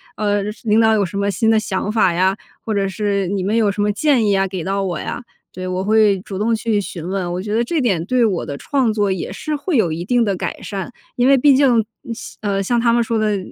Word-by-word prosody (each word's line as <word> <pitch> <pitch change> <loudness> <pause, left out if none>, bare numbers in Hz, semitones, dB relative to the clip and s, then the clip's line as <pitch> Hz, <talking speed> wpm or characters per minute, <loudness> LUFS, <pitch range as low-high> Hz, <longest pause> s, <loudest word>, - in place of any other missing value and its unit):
呃， 205 -1 0 0.2
领 220 -1 +3
导 220 -1 +4
有 205 -2 +2
什 185 +2 -6
么 200 0 0
新 220 +4 +1
的 220 - +4
想 205 -1 -2
法 210 -5 +3
呀， 185 +2 +2 0.3
或 220 - -3
者 200 -1 0
是 200 -1 -1
你 195 0 -2
们 210 +4 0
有 220 -3 +3
什 200 +1 -2
么 210 0 +2
建 250 +1 +2
议 205 - +2
呀 195 -1 +2
给 185 -3 -5
到 195 +2 -1
我 180 -4 -2
呀？ 250 - -5 0.3
对， 185 0 -5
我 185 +1 -2
会 210 -1 +3
主 195 0 -7
动 225 +2 +1
去 220 -2 0
询 175 -4 -7
问， 185 -2 -2
我 175 - -3
觉 210 +3 -4
得 230 +2 +2
这 325 +7 -1
点 200 - +1
对 250 0 +3
我 190 -6 0
的 140 - -5
创 260 - 0
作 205 -2 0
也 185 - -3
是 300 +10 -4
会 290 +1 -1
有 175 -8 +2
一 165 +2 -3
定 240 +4 +2
的 200 -2 0
改 - - -4
善， 195 +2 -5 0.2
因 245 +1 +2
为 275 0 +6
毕 280 +1 +5
竟 275 0 +4 0.3
嗯， 245 - -9
像 230 - -8
呃， 200 -2 -1
像 240 +4 +1
他 235 0 +3
们 235 0 +3
说 225 -1 -1
的， 210 -2 +1
205 Hz, 290 characters per minute, -19 LUFS, 190-230 Hz, 0.3 s, 为